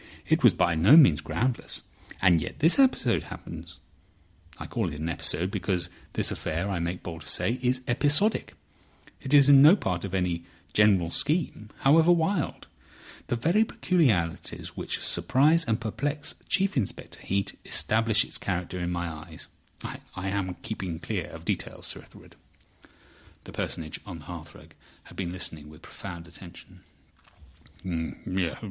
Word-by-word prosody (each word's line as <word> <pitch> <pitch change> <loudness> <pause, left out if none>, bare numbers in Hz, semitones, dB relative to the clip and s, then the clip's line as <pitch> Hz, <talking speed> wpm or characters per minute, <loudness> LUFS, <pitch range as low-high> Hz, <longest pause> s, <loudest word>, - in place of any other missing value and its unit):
It - - +2
was - - +7
by 85 - +2
no 90 - +7
means 85 - +7
groundless—and 95 -7 -1
yet - - -6
this 165 - +4
episode 255 - +3
happens. - - -9 0.8
I - - -7
call - - -2
it 75 - -7
an 80 +2 -2
episode, 85 +3 -1
because 90 -4 -2 0.2
this - - +1
affair, 85 +6 -3
I 95 - -1
make 85 +2 -3
bold 80 -2 -7
to - - -12
say, 125 +3 0
is 130 0 +1
episodic; 145 - +2 0.7
it 135 - -6
is 140 -2 +7
no 145 +5 +9
part 90 - -2
of 95 -1 -4
any 90 -2 -1 0.3
general 95 -5 +4
scheme, 145 - -1
however 160 +5 +6
wild. 170 0 0 0.6
The - - 0
very 170 - +3
peculiarities 120 - 0
which - - -3
surprise 155 +6 +3
and 110 -1 0
perplex 145 +7 -2 0.2
Chief 195 0 +2
Inspector 115 -9 -3
Heat 100 +1 -2
establish 110 0 +2
its - - -6
character 90 -1 -3
in 85 0 -2
my 85 0 -2
eyes. 80 -1 -8 0.3
I 95 +1 -6
am 95 -2 -2
keeping 95 -6 -4
clear 85 - -3
of - - -11
details, - - -3
Sir - - -3
Ethelred." - - -17 1.1
The - - -11
Personage 80 -2 -3
on 90 -4 -6
the 75 - -13
hearthrug 80 -3 -10 0.3
had - - -15
been 90 -3 -3
listening 80 -4 -4
with 75 - -15
profound 85 -3 -9
attention. 85 +1 -13
100 Hz, 145 wpm, -27 LUFS, 85-140 Hz, 1.1 s, no